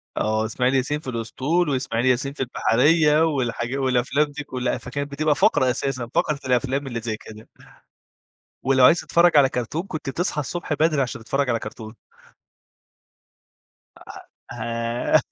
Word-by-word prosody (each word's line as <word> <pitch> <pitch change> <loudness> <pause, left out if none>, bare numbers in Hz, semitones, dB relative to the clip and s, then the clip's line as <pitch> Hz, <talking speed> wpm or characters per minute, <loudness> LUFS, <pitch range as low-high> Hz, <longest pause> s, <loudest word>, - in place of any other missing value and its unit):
آه، 110 0 0
إسماعيل 125 +4 0
ياسين 135 +3 0
في 135 - -6
الأسطول، 130 +9 -1
وإسماعيل 130 -3 -1
ياسين 130 +2 +1
في - - -14
البحرية، 150 +6 +3
والحاجا 130 -4 -2
والأفلام 130 +2 +1
دي 145 0 -8
كلّها، 125 -2 -2
فكانت 140 +3 -5
بتبقى 150 +1 +1
فقرة 130 -2 +3
أساسًا، 130 -1 -3
فقرة 155 -2 +1
الأفلام 130 +2 0
اللي 120 -3 -4
زي 110 -1 -3
كده. 110 0 -13 1.1
ولو 130 0 +4
عايز 165 +7 +6
تتفرّج 170 -1 +3
على 140 -2 +6
كارتون 125 +6 -3
كنت 155 -6 -5
تصحى 165 0 -1
الصبح 160 +2 -3
بدري، 150 -1 +2
عشان 120 -2 -4
تتفرّج 135 +4 -1
على 115 - +1
كارتون. 110 0 -9 2.6
أأه 120 - -8
آآ 115 +1 0
130 Hz, 145 wpm, -23 LUFS, 120-150 Hz, 2.6 s, عايز